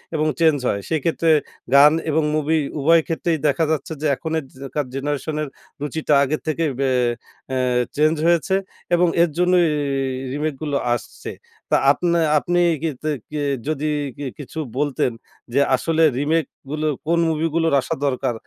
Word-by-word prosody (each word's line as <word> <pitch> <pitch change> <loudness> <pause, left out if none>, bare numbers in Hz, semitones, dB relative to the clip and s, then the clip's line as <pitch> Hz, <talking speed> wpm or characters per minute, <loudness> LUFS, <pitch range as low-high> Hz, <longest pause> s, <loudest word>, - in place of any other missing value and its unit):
এবং 155 0 +1
চেঞ্জ 160 -3 +4
হয়। 100 - -1
সেইক্ষেত্রে 165 +1 0 0.4
গান 145 +2 +8 0.2
এবং 155 +1 +2
মুভি 155 +1 +1 0.2
উভয় 165 +4 +5
ক্ষেত্রেই 165 0 0
দেখা 160 +3 +2
যাচ্ছে 160 +1 -2
যে, 155 - -2
এখনের 160 +1 -3
যে 135 +1 -8
কার 150 -2 0
জেনারেশনের 145 +2 -2 0.3
রুচিটা 150 +1 -1
আগে 150 +3 0
থেকে, 160 +1 0
বে 135 -1 +2 0.6
অ্যা 130 -1 -1 0.4
চেঞ্জ 155 +2 +3
হয়েছে 170 +3 +2 0.4
এবং 175 0 +3 0.2
এর 175 - +2
জন্যই 180 -1 +4 0.7
রিমেকগুলো 150 -1 -2 0.2
আসছে। 120 - -6 0.4
তা - - +5
আপনে 170 -1 +1 0.2
আপনি 175 +3 0 0.2
কিতে 155 -1 -3 0.2
কি 150 - -5 0.3
যদি 155 0 -1 0.3
কি 145 - -5
কিছু 150 +3 -7 0.2
বলতেন, 140 -3 0 0.4
যে 140 - +3 0.2
আসলে 165 +5 +1 0.2
রিমেকগুলো 155 0 -2 0.2
কোন 170 0 +2
মুভিগুলোর 165 0 0
আসা - - -3
দরকার? 130 -2 0
155 Hz, 145 wpm, -21 LUFS, 145-165 Hz, 0.7 s, গান